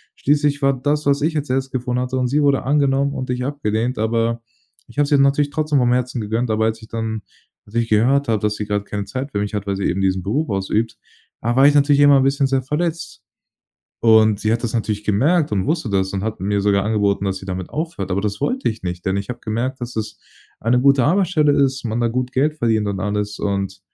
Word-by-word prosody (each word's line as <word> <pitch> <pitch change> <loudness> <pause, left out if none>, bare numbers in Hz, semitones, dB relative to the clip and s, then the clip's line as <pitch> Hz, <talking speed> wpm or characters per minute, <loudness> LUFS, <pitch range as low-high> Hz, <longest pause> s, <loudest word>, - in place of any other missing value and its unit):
schließlich 145 0 +1
war 135 0 +4
das, 145 +3 -1
was 140 0 +2
ich 155 +1 0
als 145 -2 -3
Erstes 135 +1 -1
gefunden 125 -1 -2
hatte 125 +1 -2
und 125 -1 +1
sie 145 +4 +1
wurde 140 -2 +2
angenommen 140 0 +1
und 130 -2 -5
ich 125 0 -2
abgelehnt, 125 -4 -2
aber, 115 +1 0 0.5
ich 120 - -18
habe 145 - +4
es 140 - -7
ihr 145 - +5
natürlich 140 +1 +3
trotzdem 150 -1 +1
vom 120 -1 +2
Herzen 125 -1 -1
gegönnt. 110 +3 -2
Aber, 110 0 +1
als 110 0 -2
ich 110 - -12
dann 110 -1 -4 0.4
als 105 - -16
ich 115 -1 0
gehört 130 +5 +2
habe, 110 -2 +2
dass 105 0 0
sie 105 - -4
grade 100 -1 -2
keine 105 -1 -4
Zeit 130 +7 -5
für 100 - -2
mich 105 +1 -3
hat, 100 -1 -3
weil 100 - 0
sie 95 - -4
eben 95 - 0
diesen 95 -1 0
Beruf 135 +10 -1
ausübt, 105 +3 -1 0.4
da 120 +1 0
war 135 +1 +7
ich 145 - +5
natürlich 145 0 +4
immer 145 0 +7
‘n 135 - +3
bisschen 135 0 +2
sehr 135 -1 +1
verletzt. 165 +4 -3 0.8
Und, 110 -2 +4
sie 110 +1 +1
hat 115 +1 -1
das 120 -1 -3
natürlich 105 -2 -2
gemerkt 145 - +2
und 95 -2 0
wusste 155 -4 -1
das 95 -1 0
und 95 0 -3
hat 110 0 -3
mir 100 +1 0
sogar 100 -1 +2
angeboten, 100 -2 +1
dass 95 -1 -1
sie 95 - -11
damit 95 -1 -5
aufhört, 155 - -4
aber 95 +2 0
das 105 -1 -3
wollte 260 +2 0
ich 110 -1 -5
nicht, 90 0 -5
denn 95 +1 +1
ich 100 +2 -4
habe 120 - -5
gemerkt, 125 +5 -3
dass 120 -1 -6
es 105 -1 -4 0.4
eine 120 +2 +2
gute 140 0 +4
Arbeitsstelle 165 -2 +2
ist, 135 -1 +1
man 110 +2 -2
da 120 - +2
gut 125 +1 -2
Geld 150 +4 +1
verdient 110 -3 +1
und 100 -1 -3
alles 105 +1 -2
und, 100 -1 -2
120 Hz, 245 wpm, -20 LUFS, 105-140 Hz, 0.8 s, war